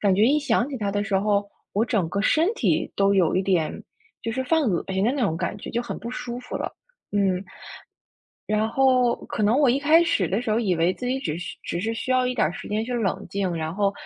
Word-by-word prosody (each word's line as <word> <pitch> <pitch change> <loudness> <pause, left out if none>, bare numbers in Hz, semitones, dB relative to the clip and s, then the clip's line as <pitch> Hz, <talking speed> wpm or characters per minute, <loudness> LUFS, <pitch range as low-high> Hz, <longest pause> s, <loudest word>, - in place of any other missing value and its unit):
感 195 -2 +3
觉 205 - +4
一 285 +6 +4
想 255 -4 +1
起 265 - -4
他 205 -2 -1
的 205 +1 -1
时 215 -2 -2
候， 200 +1 +2 0.3
我 210 +3 +3
整 215 -9 0
个 200 +4 -1
身 320 - +3
体 - - 0
都 200 0 +3
有 180 -3 +3
一 185 - +2
点 180 -5 0 0.4
就 230 - -2
是 260 +3 -1
犯 320 +4 +2
恶 195 -10 +1
心 190 +1 0
的 240 - +2
那 285 - -2
种 195 -9 +1
感 - - -3
觉， - - -9
就 235 - -1
很 - - -5
不 235 - -6
舒 245 -1 -5
服 250 0 -6
了。 - - -4 0.4
嗯， 190 -2 +1 1.0
然 215 +1 +1
后， 250 0 +3
可 - - -3
能 215 +4 +3
我 280 -4 +4
一 265 - +2
开 315 +4 +5
始 215 - +1
的 190 +6 0
时 235 -3 -2
候， 220 - +2
以 195 -6 +1
为 170 +3 +2
自 250 - -7
己 255 +1 0
只 155 - -3
是 180 - -7
只 170 - -3
是 220 +5 -1
需 240 +4 -3
要 255 0 +3
一 250 - -2
点 220 - +3
儿 155 - 0
时 - - -8
间 215 +1 -1
去 250 +2 -4
冷 225 -6 -1
静， 195 -2 -1
然 160 0 -3
后 200 +1 +1
215 Hz, 280 characters per minute, -24 LUFS, 195-250 Hz, 1.0 s, 开